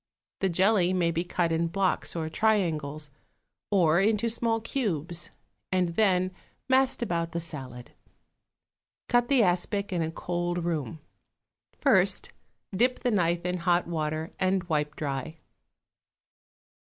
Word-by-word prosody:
The 190 - +1
jelly 185 +1 +3
may 175 -2 +2
be 170 +1 -1
cut 175 -1 -1
in 165 +1 +1
blocks 185 +2 0
or 160 -2 -2
triangles, 155 -7 0 0.6
or 175 -5 +4
into 220 +2 +2
small 230 0 0
cubes, 175 - -2 0.4
and 185 -2 +2
then 185 0 +2 0.4
massed 260 -1 +3
about 170 -5 -2
the 170 - -1
salad. 135 -7 -8 1.2
Cut 240 0 +3
the 265 -3 +4
aspic 195 +2 0
in 175 - 0
a 160 - -1
cold 175 +1 -3
room; 160 -2 -3 0.8
first 195 -8 +2 0.4
dip 250 +5 +2
the 245 - +1
knife 175 -4 +1
in 180 0 -1
hot 175 0 +2
water 155 -1 -3
and 185 0 +1
wipe 150 -3 -1
dry. 145 +2 -4
175 Hz, 130 wpm, -27 LUFS, 165-200 Hz, 1.2 s, or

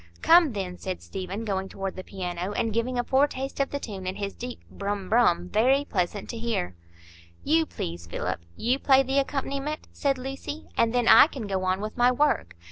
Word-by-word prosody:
"Come, 330 -5 +6
then," 185 -3 -4
said 185 -1 -4
Stephen, 195 +3 -5
going 190 -2 -2
toward 195 -1 -5
the 185 - -6
piano, 180 0 -4
and 225 +1 -1
giving 240 +3 -1
a 245 - +1
foretaste 270 +1 0
of 275 - +1
the 285 - -3
tune 195 -7 -6
in 185 - -2
his 200 -1 -4
deep 245 0 -7
"brum 200 -1 -4
brum," 180 -7 +3
very 260 +8 +3
pleasant 190 -3 -2
to 230 - -6
hear. 225 - -2 0.7
"You, 320 +1 +3
please, 85 0 -6
Philip,—you 85 - -2
play 270 -1 +5
the 270 +1 +1
accompaniment," 275 +2 -3
said 275 -2 0
Lucy, 270 +4 -6
"and 230 -1 +3
then 245 -1 +1
I - - +9
can 265 -8 -6
go 190 -2 -2
on 185 +1 0
with 215 +2 -5
my 245 +1 +5
work. 250 - +1
225 Hz, 195 wpm, -26 LUFS, 190-270 Hz, 0.7 s, I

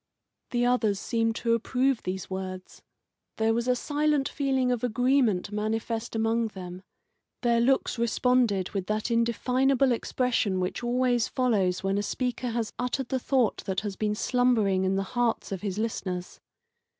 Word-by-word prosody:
The 245 0 +1
others 225 -5 +2
seemed 225 +1 0
to 230 0 0
approve 250 +2 +1
these 185 0 -4
words. 185 -1 -6 0.6
There 225 0 +2
was 235 +2 -1
a 250 - +3
silent 295 +1 0
feeling 265 -3 0
of 245 -2 -1
agreement 245 -5 +2
manifest 225 +2 -2
among 225 +1 +1
them; 185 -3 -8 0.6
their 235 -1 +3
looks 260 -1 +1
responded 235 -4 +2
with 195 -3 -3
that 215 +2 -1
indefinable 250 +3 +2
expression 230 -5 0
which 185 +6 -3
always 245 -2 +1
follows 205 -9 +1
when 195 +1 +1
a - - 0
speaker 250 +3 -2
has 230 -1 -2
uttered 250 +1 -2
the 260 - 0
thought 250 -3 +1
that 190 -1 -1
has 205 -2 -4
been 210 +1 -1
slumbering 220 -6 +2
in 190 +1 +1
the 195 - 0
hearts 240 -4 0
of 190 - -4
his 200 -2 -3
listeners. 185 -5 -3
230 Hz, 155 wpm, -27 LUFS, 200-250 Hz, 0.6 s, a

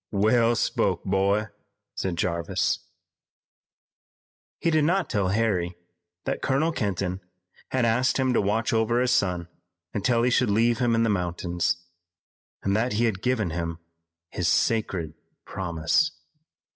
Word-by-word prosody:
"Well 115 +3 +3
spoke, - - 0
boy," 100 +2 +1 0.4
said 95 -2 -2
Jarvis. 85 +3 0 1.8
He 165 - +1
did 155 -1 +3
not 180 +4 +1
tell 100 -4 +1
Harry 95 -4 0 0.5
that - - -2
Colonel 140 +5 +1
Kenton 95 - -2 0.5
had 130 -2 +1
asked 125 +3 +2
him 130 -2 +1
to - - +3
watch 110 +3 0
over 115 +1 +2
his 125 0 +2
son 90 -6 +1 0.5
until 115 +3 +1
he 125 - +2
should 120 - +3
leave 115 +3 +2
him 120 -2 +2
in 115 - +2
the 115 - +2
mountains, 85 -2 -1 0.9
and 100 0 +1
that 115 +3 +1
he 115 +3 +2
had 100 -5 -1
given 115 -9 0
him 85 0 -3 0.5
his 90 - -1
sacred 90 -3 +1 0.3
promise. 90 - 0
105 Hz, 135 wpm, -26 LUFS, 90-120 Hz, 1.8 s, Well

